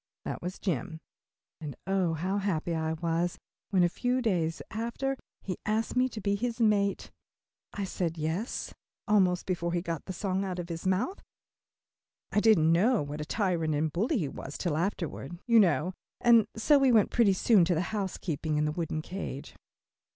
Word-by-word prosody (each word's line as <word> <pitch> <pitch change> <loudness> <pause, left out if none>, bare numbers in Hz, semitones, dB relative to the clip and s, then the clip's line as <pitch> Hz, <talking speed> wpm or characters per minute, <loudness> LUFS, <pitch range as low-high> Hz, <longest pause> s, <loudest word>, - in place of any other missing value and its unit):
That - - -4
was 180 +2 -5
Jim, 160 - -3 0.6
and 150 -5 -6
oh, 190 -3 +1
how 185 +6 -1
happy 175 -4 -1
I 160 0 -1
was, 170 +2 -1 0.3
when, 185 -3 +3
a - - +5
few 245 +8 0
days 175 -9 0
after, 235 +5 -2 0.3
he 185 -3 -4
asked 220 +2 -1
me 255 +1 +3
to 230 - -7
be 200 -1 0
his 235 +3 -2
mate. 205 -3 +2 0.6
I 205 - -3
said 175 -3 -2
"yes," 160 +9 -3 0.3
almost 190 -4 +3
before 170 -2 -1
he - - +1
had 175 - -3
got 165 -2 -3
the 190 - -5
song 190 +1 -1
out 185 -2 -3
of 175 -1 -5
his 165 +2 -4
mouth 190 - 0 1.1
I - - +3
didn't 195 -8 +5
know 205 - +3
what 145 +1 -5
a - - -4
tyrant 170 -6 0
and 155 +1 0
bully 225 - +1
he 165 -9 -1
was 135 +1 -7
till 170 -5 -1
afterward, 170 -2 -3
you 230 -2 +6
know 180 -2 +3 0.3
and 235 -2 +5
so 280 +6 +4
we 270 -2 +4
went 220 -4 +4
pretty 225 -5 +4
soon 195 0 +4
to 170 -2 +1
housekeeping 175 -6 -2
in 150 - +2
the 150 - 0
wooden 155 -1 -3
cage. 175 -7 -6
185 Hz, 180 wpm, -29 LUFS, 165-210 Hz, 1.1 s, you